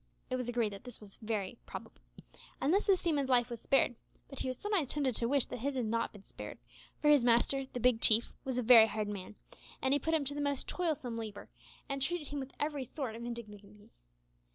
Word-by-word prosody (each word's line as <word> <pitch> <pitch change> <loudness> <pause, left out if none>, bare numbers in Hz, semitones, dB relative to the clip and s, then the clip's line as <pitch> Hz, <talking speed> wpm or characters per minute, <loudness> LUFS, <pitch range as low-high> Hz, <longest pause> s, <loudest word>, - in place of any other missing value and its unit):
It - - +1
was 250 -1 -3
agreed 230 -4 0
that 195 - -10
this 245 -2 -11
was 205 -2 -14
highly 205 -4 -2
probable, 60 - -9 0.6
and 290 +5 +2
thus 405 +3 +2
the 390 -2 +5
seaman's 295 -7 0
life 245 -1 +3
was 235 - -5
spared; 270 -2 +2 0.3
but 275 - -8
he - - -2
was 255 -1 -3
sometimes 405 -8 0
tempted 275 -2 0
to 235 - +1
wish 275 0 +3
that - - -6
it 280 0 -1
had 250 -3 0
not 230 +1 -1
been 205 -2 -14
spared, - - -9 0.4
for 295 - +3
his 290 -4 +5
master, 245 +3 +3
the 245 - -4
Big 245 -1 +3
Chief, 225 +1 +6
was 260 -2 -3
a 250 - +1
very 225 -1 +8
hard 215 0 -2
man; 205 0 -6 0.5
he 280 +2 +3
put 320 +4 0
him 300 -3 0
to 285 - -2
the 290 - -3
most 285 -2 -1
toilsome 290 -10 -2
labour, 215 -3 -7 0.4
and 275 -1 -3
treated 305 +2 -1
him 290 - -3
with 265 0 -6
every 295 -2 -1
sort 255 -3 -5
of 230 - -7
indignity. 210 -4 -8
250 Hz, 225 wpm, -33 LUFS, 230-285 Hz, 0.6 s, very